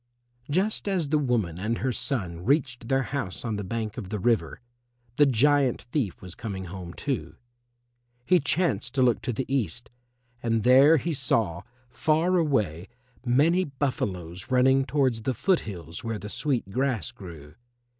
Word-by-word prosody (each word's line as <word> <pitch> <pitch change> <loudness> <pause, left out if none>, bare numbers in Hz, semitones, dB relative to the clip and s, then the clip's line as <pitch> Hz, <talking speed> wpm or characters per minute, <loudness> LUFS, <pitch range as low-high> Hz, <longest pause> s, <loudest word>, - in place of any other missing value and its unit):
Just 195 +8 0
as 180 -7 0
the 155 0 +3
woman 110 - 0
and 110 +4 -1
her 130 +2 -1
son 95 -10 -3
reached 125 - 0
their 135 +1 +2
house 125 -10 -4
on 110 -2 -1
the 105 - -4
bank 110 +3 -4
of 95 -5 -7
the 105 - -2
river, 115 +3 0 0.6
the 145 - +6
giant 135 +1 +3
thief 120 - -2
was 90 -2 -7
coming 95 -4 -6
home 90 -1 -8
too. 140 -3 -3 0.9
He 180 +4 +5
chanced 140 - 0
to 130 - +3
look 120 -3 +3
to 125 - -2
the 125 +3 -3
east, 120 -4 -2 0.5
and 115 -2 0
there 135 +6 +7
he 165 +4 -2
saw, 110 - 0 0.3
far 160 +8 +1
away, 105 - 0 0.4
many 160 +9 +4
buffaloes 95 - -3
running 130 +1 +4
towards 130 -3 +1
the 130 +3 -1
foot 185 - +2
hills 85 -4 -7
where 115 -2 -3
the 105 +1 -8
sweet 125 -6 -2
grass 125 - 0
grew. 80 -6 -11
125 Hz, 160 wpm, -26 LUFS, 100-140 Hz, 0.9 s, there